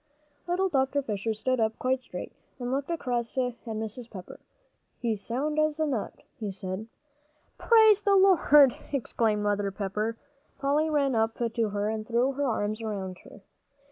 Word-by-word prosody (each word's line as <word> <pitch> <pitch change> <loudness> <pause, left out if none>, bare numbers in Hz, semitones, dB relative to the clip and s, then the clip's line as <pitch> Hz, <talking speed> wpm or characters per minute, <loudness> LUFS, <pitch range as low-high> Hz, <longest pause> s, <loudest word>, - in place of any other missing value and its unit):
Little 365 +2 +1
Dr. 280 -3 +1
Fisher 220 -1 -2
stood 255 +4 0
up 220 0 +1
quite 260 0 0
straight - - -7 0.3
and 245 -1 -4
looked 275 +3 -2
across 245 -8 -2
at 250 -1 +1
Mrs. 220 +2 -5
Pepper. 185 -4 -10 0.6
"He's 225 -4 -2
sound 285 +8 -1
as 310 0 +1
a 315 - +2
nut," 255 -8 -3 0.2
he 215 -3 -3
said. 190 +2 -5 0.7
"Praise 440 -3 +6
the 400 -1 +3
Lord!" 300 -9 +6 0.2
exclaimed 225 -6 0
Mother 205 -1 0
Pepper. 210 +3 -3 0.4
Polly 290 +3 +1
ran 280 -3 +2
up 225 0 +1 0.2
to 225 -2 0
her 205 0 -1
and 215 0 -3
threw 240 +3 +2
her 280 +1 -1
arms 215 -1 -1
around 195 -4 -4
her. 205 - -14
240 Hz, 160 wpm, -28 LUFS, 215-285 Hz, 0.7 s, Praise